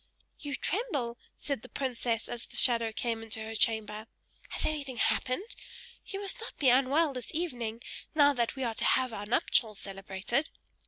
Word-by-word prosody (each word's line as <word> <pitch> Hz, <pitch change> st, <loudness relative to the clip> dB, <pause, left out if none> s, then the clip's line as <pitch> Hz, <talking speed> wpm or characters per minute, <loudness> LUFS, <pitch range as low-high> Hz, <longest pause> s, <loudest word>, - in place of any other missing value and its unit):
"You 285 Hz, -2 st, -2 dB
tremble!" 280 Hz, -, -1 dB, 0.2 s
said 280 Hz, -6 st, -2 dB
the 255 Hz, -, -12 dB
princess, 240 Hz, -4 st, -1 dB
as 235 Hz, -, -6 dB
the -, -, -10 dB
shadow 230 Hz, -3 st, +4 dB
came 230 Hz, 0 st, -2 dB
into 225 Hz, 0 st, -3 dB
her 220 Hz, 0 st, -5 dB
chamber. 220 Hz, -1 st, +1 dB, 0.4 s
"Has -, -, -1 dB
anything 280 Hz, -5 st, -2 dB
happened? 265 Hz, -, +1 dB, 0.5 s
You 390 Hz, -, -4 dB
must 400 Hz, +2 st, +2 dB
not 460 Hz, -, -7 dB
be 270 Hz, -, +5 dB
unwell 275 Hz, +5 st, +4 dB
this 250 Hz, -2 st, -4 dB
evening, 240 Hz, -9 st, -2 dB, 0.3 s
now 290 Hz, -1 st, +6 dB
that 235 Hz, -3 st, 0 dB
we 265 Hz, -, -3 dB
are 235 Hz, -2 st, 0 dB
to -, -, -2 dB
have 255 Hz, -2 st, +3 dB
our 205 Hz, -1 st, -5 dB
nuptials 215 Hz, -2 st, +2 dB
celebrated." 195 Hz, +8 st, -2 dB
245 Hz, 170 wpm, -31 LUFS, 225-280 Hz, 0.5 s, now